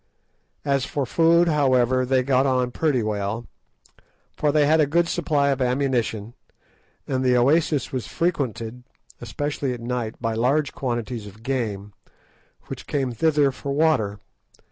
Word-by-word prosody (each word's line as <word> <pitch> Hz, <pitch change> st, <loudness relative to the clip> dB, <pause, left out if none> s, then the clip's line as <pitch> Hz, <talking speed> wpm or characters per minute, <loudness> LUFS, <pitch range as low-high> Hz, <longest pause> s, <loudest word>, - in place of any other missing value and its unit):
As 140 Hz, -2 st, +1 dB
for 140 Hz, 0 st, -2 dB
food, 170 Hz, +5 st, +4 dB
however, 130 Hz, -4 st, +2 dB
they 130 Hz, 0 st, +2 dB
got 135 Hz, +1 st, +2 dB
on 125 Hz, -1 st, +1 dB
pretty 135 Hz, -3 st, 0 dB
well, 105 Hz, +2 st, -2 dB, 0.9 s
for 150 Hz, -, +1 dB
they 150 Hz, 0 st, +3 dB
had 155 Hz, +2 st, +4 dB
a 150 Hz, -, +3 dB
good 170 Hz, +4 st, +2 dB
supply 150 Hz, -5 st, +1 dB
of 135 Hz, -1 st, 0 dB
ammunition, 125 Hz, -4 st, -1 dB, 0.7 s
and 130 Hz, -1 st, -1 dB
the 125 Hz, -1 st, +3 dB
oasis 145 Hz, +1 st, +2 dB
was 130 Hz, -4 st, -4 dB
frequented, 125 Hz, -, -2 dB, 0.4 s
especially 145 Hz, -2 st, -3 dB
at 120 Hz, -, -7 dB
night, 120 Hz, -1 st, -3 dB
by 115 Hz, -1 st, -1 dB
large 135 Hz, +6 st, +1 dB
quantities 120 Hz, -3 st, -4 dB
of 105 Hz, +3 st, -14 dB
game, 105 Hz, -6 st, -3 dB, 0.7 s
which -, -, -8 dB
came 135 Hz, -3 st, -1 dB
thither 145 Hz, +3 st, +2 dB
for 140 Hz, +1 st, -5 dB
water. 140 Hz, -10 st, +1 dB
130 Hz, 145 wpm, -23 LUFS, 120-145 Hz, 0.9 s, food